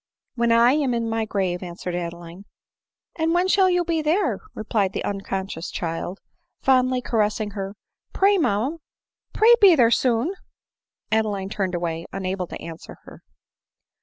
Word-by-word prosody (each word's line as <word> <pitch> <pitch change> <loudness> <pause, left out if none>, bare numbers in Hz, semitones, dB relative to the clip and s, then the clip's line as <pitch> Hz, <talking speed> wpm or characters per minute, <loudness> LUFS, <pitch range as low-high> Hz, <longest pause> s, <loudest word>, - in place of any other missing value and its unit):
" - - -62
When 235 -1 +1
I 235 +2 +6
am 275 -4 +1
in 230 -1 -1
my 225 0 0
grave," 190 -4 -2
answered 180 0 -6
Adeline. 170 0 -6
• - - -13 0.4
" - - -62
And 325 +1 +1
when 360 +1 +2
shall 380 0 +4
you 355 -1 +1
be 330 -1 0
there 320 +7 +1
?" - - -33
replied 210 -3 -1
the - - -3
uncon 195 -1 -3
scious 170 -3 -7
child, 170 +1 -4 0.4
fondly 255 -1 +2
caressing 215 -2 0
her; 195 0 -5 0.4
"pray, 395 0 +3
mamma 265 +4 0 0.3
— - - -55
pray 455 +2 +6
be 385 -4 +8
there 235 -5 +4
soon 250 +8 +1 0.4
!" - - -55
Adeline 210 -3 0
turned 190 -3 -2
away, 170 -1 -3
unable 185 -1 -3
to - - -8
answer 165 -1 -10
her. - - -14
220 Hz, 175 wpm, -23 LUFS, 190-275 Hz, 0.4 s, be